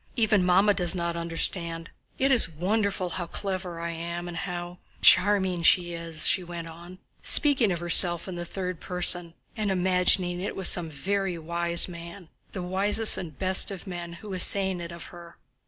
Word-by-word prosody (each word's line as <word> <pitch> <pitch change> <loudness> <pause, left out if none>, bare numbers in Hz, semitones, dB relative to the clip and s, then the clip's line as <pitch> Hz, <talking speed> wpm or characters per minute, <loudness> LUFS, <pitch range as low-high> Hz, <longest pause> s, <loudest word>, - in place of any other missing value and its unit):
Even 215 -5 +1
Mamma 190 +3 +3
does 180 -1 +3
not 170 -1 -3
understand. 170 0 -3 0.3
It 270 +1 +1
is 245 -10 +5
wonderful 190 +3 -2
how 175 0 -6
clever 185 -2 -5
I 170 0 -5
am 170 +1 -6
and 175 - -8
how... 175 0 -7 0.2
charming 190 -2 +4
she 175 +1 +2
is," 165 -2 -1
she 185 - +2
went 170 -1 -8
on, 170 +3 -13 0.2
speaking 270 - +2
of 175 - -3
herself 175 0 +3
in 185 - -7
the 175 0 -6
third 180 -1 -6
person, 175 -1 +1 0.2
and 215 -3 -3
imagining 180 -1 0
it 195 - -5
was 190 - +4
some 170 -2 +1
very 190 +5 -3
wise 170 +1 +1
man—the 175 +1 -11
wisest 200 +4 +3
and 165 -6 -8
best 190 0 +3
of 195 -3 -9
men—who 175 +1 -9
was 185 -2 0
saying 190 -2 +4
it 170 0 -8
of 170 0 -10
her. 170 -1 -14
175 Hz, 170 wpm, -25 LUFS, 170-190 Hz, 0.3 s, is